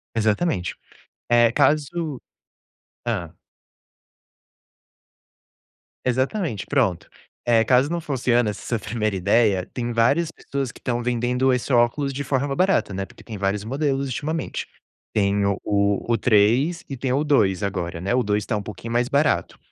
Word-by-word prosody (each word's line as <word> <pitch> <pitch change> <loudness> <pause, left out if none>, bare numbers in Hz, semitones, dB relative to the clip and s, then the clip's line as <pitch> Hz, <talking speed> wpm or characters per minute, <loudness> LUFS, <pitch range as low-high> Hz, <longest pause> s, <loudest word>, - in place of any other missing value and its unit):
Exatamente. 110 - 0 0.5
É, 120 -1 +5
caso 150 +2 +1 0.9
hã? 90 -9 -2 2.7
Exatamente, 130 - -1
pronto. 115 -12 0 0.4
Eh, 115 -2 +4
caso 130 +2 +4
não 170 +1 -1
funciona 120 -6 +1
essa 105 - -6
sua 115 - -1
primeira 110 -1 -2
ideia, 100 0 +2
tem 120 -1 -3
várias 125 +8 +2
pessoas 135 -5 -4
que - - -16
estão 120 -1 -2
vendendo 125 +2 +1
esse 125 +1 -1
óculos 125 +4 +2
de 140 +2 -3
forma 135 +1 -1
barata, 185 - +2
né, 95 +1 -3
porque - - -17
tem 110 -3 -7
vários 100 +1 -1
modelos 135 +3 -1
ultimamente. 155 +5 -3 0.5
Tem 100 -1 +2
o 100 -1 +1
o 100 -1 +1
o - - +3
3 125 +11 +3
e 135 - -5
tem 130 0 -2
o 140 +3 +1
2 105 -10 +2
agora, 90 -4 -3
né. 95 +6 -1
O 125 - +2
2 105 0 0
está 110 - -2
um 105 - -2
pouquinho 110 +3 -7
mais 120 +1 +1
barato. 140 +1 +1
120 Hz, 150 wpm, -23 LUFS, 105-140 Hz, 2.7 s, É